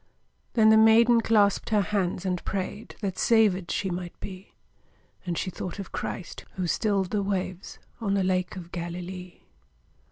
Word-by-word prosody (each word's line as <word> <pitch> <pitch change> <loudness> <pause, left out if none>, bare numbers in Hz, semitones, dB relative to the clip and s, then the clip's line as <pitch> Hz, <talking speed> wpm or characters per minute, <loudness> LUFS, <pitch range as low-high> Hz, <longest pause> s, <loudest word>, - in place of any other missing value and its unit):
Then 220 -2 +6
the 220 - +7
maiden 230 +2 +6
clasped 210 -3 +3
her 210 -2 +3
hands 190 -2 -1
and 180 -2 -1
prayed 200 +2 -4
That 190 -3 -3
savèd 205 -6 +3
she 190 - -1
might 175 0 -6
be; 190 0 -9 0.7
And 170 -2 -1
she 185 - -2
thought 180 +1 -6
of 195 - -7
Christ, 180 - -5
who 185 - -2
stilled 195 +1 0
the 210 - +1
waves 190 -1 -3 0.2
On 200 -4 0
the 195 - +2
Lake 185 0 0
of 175 -2 -9
Galilee. 180 +1 -6
190 Hz, 160 wpm, -27 LUFS, 180-210 Hz, 0.7 s, the